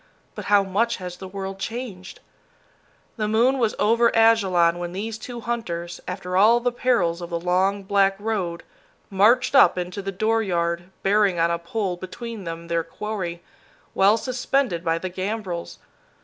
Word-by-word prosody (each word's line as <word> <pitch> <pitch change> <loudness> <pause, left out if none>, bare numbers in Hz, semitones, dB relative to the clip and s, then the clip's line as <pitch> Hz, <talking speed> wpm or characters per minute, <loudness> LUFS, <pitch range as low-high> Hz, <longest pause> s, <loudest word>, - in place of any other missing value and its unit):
But - - -7
how 205 -1 +4
much 205 +5 0
has 180 -1 -7
the 190 - -8
world 195 0 -6
changed? 210 -4 -6 1.0
The 215 -1 -1
moon 240 +5 +3
was 225 -3 +1
over 230 +2 +3
Ajalon 190 -7 +4
when 175 0 -5
these 220 +3 -4
two 240 +1 -7
hunters, 175 -8 -4
after 180 0 -4
all 220 +5 +6
the 245 +1 0
perils 215 -9 +1
of 170 - -6
the 170 -1 -2
long, 190 +3 +1
black 195 0 +2
road, 195 -6 -3 0.5
marched 225 +8 +4
up 275 - +6
into 180 +3 -4
the 195 0 -4
dooryard, 180 -5 0
bearing 200 -2 +3
on 170 +1 +3
a 170 - -1
pole 185 +1 -3
between 210 +3 -7
them 165 0 -6
their 170 -1 0
quarry, 175 -1 -5 0.5
well 200 +3 +4
suspended 255 -6 -1
by 165 0 +1
the 185 - -4
gambrels. 185 -1 -4
195 Hz, 160 wpm, -23 LUFS, 175-225 Hz, 1.0 s, all